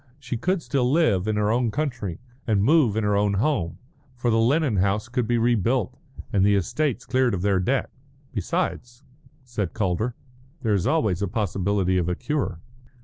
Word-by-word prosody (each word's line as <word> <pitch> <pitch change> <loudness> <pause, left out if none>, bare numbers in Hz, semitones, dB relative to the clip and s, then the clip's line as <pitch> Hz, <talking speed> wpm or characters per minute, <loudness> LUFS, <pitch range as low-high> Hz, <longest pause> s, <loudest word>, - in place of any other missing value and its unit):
She 125 -3 -4
could 175 +8 -1
still 130 -3 0
live 115 - +2
in 110 - 0
her 105 0 +1
own 120 0 +1
country 120 - -3 0.3
and 105 -3 +2
move 130 -5 +4
in 110 - +1
her 105 0 +2
own 100 0 +2
home. 105 - 0 0.4
For 120 -1 0
the 115 - +3
Lennon 130 0 +2
house 100 +4 +1
could 120 -1 -1
be 120 0 +2
rebuilt 120 0 +1 0.4
and 100 -2 +3
the 100 0 +4
estates 120 - -1
cleared 130 -4 +2
of 90 - -4
their 100 -2 +2
debt. 130 +9 0 0.4
"Besides," 120 +4 -3 0.4
said 110 -8 -4
Calder, 110 +3 -1 0.5
"there 110 -3 +2
is 95 -4 +1
always 105 - +1
a 100 - 0
possibility 95 -2 0
of 85 0 -1
a 90 - 0
cure." 140 - -2
110 Hz, 180 wpm, -24 LUFS, 100-125 Hz, 0.5 s, move